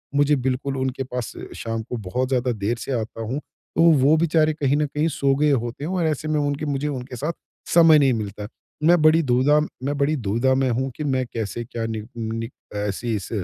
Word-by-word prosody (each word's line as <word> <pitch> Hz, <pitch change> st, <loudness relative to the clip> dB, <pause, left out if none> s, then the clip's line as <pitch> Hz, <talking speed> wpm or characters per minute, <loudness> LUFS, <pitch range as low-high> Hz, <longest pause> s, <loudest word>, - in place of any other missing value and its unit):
मुझे 145 Hz, +1 st, +4 dB
बिल्कुल 130 Hz, +1 st, -2 dB
उनके 130 Hz, 0 st, -2 dB
पास 125 Hz, -3 st, -5 dB, 0.2 s
शाम 115 Hz, -1 st, -3 dB
को 125 Hz, -, -5 dB
बहुत 110 Hz, +5 st, -2 dB
ज़्यादा 125 Hz, -1 st, +1 dB
देर 110 Hz, +1 st, -2 dB
से 125 Hz, -, -6 dB
आता 110 Hz, +1 st, -6 dB
हूँ। 120 Hz, +6 st, -3 dB
तो 160 Hz, -, -6 dB, 0.2 s
वो 145 Hz, +4 st, +5 dB
बेचारे 155 Hz, -1 st, +3 dB
कहीं 145 Hz, -2 st, +1 dB
न 150 Hz, -, +2 dB
कहीं 150 Hz, +2 st, -1 dB
सो 140 Hz, -1 st, +2 dB
गए 150 Hz, +1 st, +3 dB
होते 120 Hz, 0 st, -2 dB
हैं 160 Hz, -, -3 dB
और 180 Hz, -3 st, 0 dB
ऐसे 155 Hz, 0 st, -2 dB
में 155 Hz, -1 st, +1 dB
उनके 145 Hz, +1 st, -1 dB
मुझे 145 Hz, 0 st, -1 dB
उनके 130 Hz, -3 st, -5 dB
साथ 150 Hz, +8 st, -2 dB, 0.4 s
समय 165 Hz, -2 st, +7 dB
नहीं 135 Hz, -3 st, +4 dB
मिलता 105 Hz, -2 st, -4 dB
है। 105 Hz, -, -7 dB, 0.3 s
मैं 170 Hz, +1 st, +5 dB
बड़ी 155 Hz, +1 st, +5 dB
दूधा 135 Hz, +3 st, +3 dB, 0.2 s
मैं 145 Hz, +2 st, -1 dB
बड़ी 145 Hz, +2 st, +2 dB
दुविधा 120 Hz, +2 st, +1 dB
में 135 Hz, -1 st, +1 dB
हूँ 130 Hz, +3 st, 0 dB
कि 150 Hz, -, -5 dB
मैं 130 Hz, -3 st, 0 dB
कैसे 115 Hz, 0 st, -3 dB
क्या 115 Hz, -1 st, -4 dB
नि 110 Hz, -1 st, -3 dB, 0.2 s
नि 115 Hz, 0 st, -3 dB, 0.3 s
ऐसी 105 Hz, +3 st, -2 dB
इस 100 Hz, -4 st, -5 dB
130 Hz, 220 wpm, -23 LUFS, 115-150 Hz, 0.4 s, समय